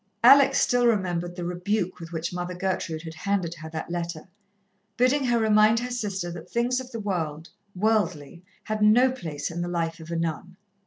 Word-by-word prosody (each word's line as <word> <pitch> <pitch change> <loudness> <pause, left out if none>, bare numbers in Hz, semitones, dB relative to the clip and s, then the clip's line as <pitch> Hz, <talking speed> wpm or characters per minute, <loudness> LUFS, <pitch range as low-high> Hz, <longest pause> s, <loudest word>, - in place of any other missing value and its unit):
Alex 275 +3 +7
still 245 -1 +3
remembered 175 -5 0
the 175 -1 -5
rebuke 180 +2 -2
with 165 -1 -9
which 170 +1 -3
Mother 180 0 -4
Gertrude 180 -3 -2
had 160 -1 -7
handed 185 -1 -1
her 160 -1 -9
that 160 +1 -6
letter, 170 -1 -4 0.7
bidding 260 +3 +3
her 240 -1 +2
remind 215 0 +4
her 250 +1 -4
sister 195 -7 -3
that 170 -1 -9
things 245 +2 0
of 260 -1 -8
the 230 -3 -6
world, 165 -6 -3 0.3
worldly, 180 -6 0 0.2
had 215 0 -3
no 240 +5 +5
place 160 - -5
in 170 +1 -4
the 175 - -2
life 165 -1 -2
of 160 0 -11
a 170 - -3
nun. 165 +3 -3
180 Hz, 190 wpm, -26 LUFS, 170-220 Hz, 0.7 s, Alex